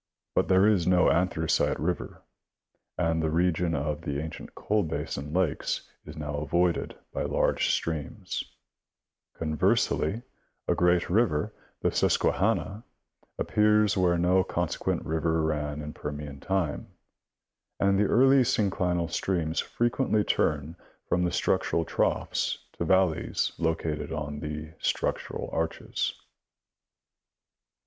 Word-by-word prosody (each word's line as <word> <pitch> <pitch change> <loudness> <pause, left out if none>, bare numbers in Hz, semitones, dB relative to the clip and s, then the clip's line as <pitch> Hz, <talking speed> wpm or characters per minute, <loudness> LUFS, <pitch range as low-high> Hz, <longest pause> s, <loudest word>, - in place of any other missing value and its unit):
But - - +2
there 95 +1 +5
is 100 -6 +3
no 90 -1 +5
Anthracite 85 -2 +1
river, 90 +2 -3 0.7
and 80 -2 +1
the 80 - 0
region 85 0 +1
of 75 +1 -2
the 70 -1 -3
ancient 80 +1 -7
coal 105 +1 +1
basin 75 -4 -4
lakes 90 -2 -1 0.2
is 75 0 -9
now 75 -1 -4
avoided 85 +3 0 0.2
by - - -2
large - - +1
streams; 80 -3 -2 0.9
con 75 -1 -2
versely, 90 +7 +1 0.4
a - - +3
great 90 0 +3
river 95 -8 +2
— - - -38
the - - +2
Susquehanna 105 +4 +1 0.3
— - - -39
appears 105 0 +3
where 90 -2 +3
no 90 +2 +3
con 85 -1 -1
sequent - - -2
river 80 +1 0
ran 75 -1 -2
in 75 +1 -6
Permian 75 -1 -6
time, 95 -3 -1 0.9
and 100 0 +3
the 105 - +4
early 135 +5 +5
synclinal 90 -8 +1
streams 85 -2 -1
frequently 120 -2 +1
turn 75 -2 0 0.3
from 90 0 +1
the 90 - 0
structural 85 - +1
troughs - - 0 0.2
to - - -3
valleys 95 -4 +2
located 80 -2 -1
on 75 -2 -4
the 75 +1 -6
structural - - -2
arches. 80 0 -2
85 Hz, 125 wpm, -28 LUFS, 75-95 Hz, 0.9 s, there